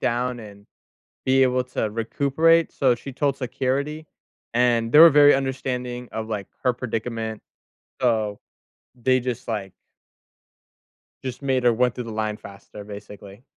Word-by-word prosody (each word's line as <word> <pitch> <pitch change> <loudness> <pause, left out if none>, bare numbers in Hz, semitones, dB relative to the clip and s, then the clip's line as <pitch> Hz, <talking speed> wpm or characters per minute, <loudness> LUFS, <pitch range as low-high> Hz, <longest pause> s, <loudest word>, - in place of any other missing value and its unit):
down 125 +1 -1
and 100 -1 -13 0.6
be 135 0 +4
able 125 0 +2
to 110 -4 -3
recuperate, 140 +9 +2
so 130 -3 +2
she 135 +2 -9
told 140 0 0
security, 135 +4 -2 0.5
and 120 -1 +2
they 150 - +7
were 165 0 +11
very 145 0 +7
understanding 125 -2 -3
of, 110 0 -4
like, 105 -3 -4 0.2
her 125 - +4
predicament, 115 -2 -4 0.6
so 110 -4 +1 0.6
they 130 +1 +3
just, 125 -1 -5
like 100 -4 -3 1.5
just 130 0 -5
made 130 -2 0
her 120 -1 +4
went 125 +1 +1
through 125 - -5
the 115 - -7
line 110 -1 -2
faster, 100 +1 -12
basically. 105 +1 -11
125 Hz, 140 wpm, -23 LUFS, 110-130 Hz, 1.5 s, were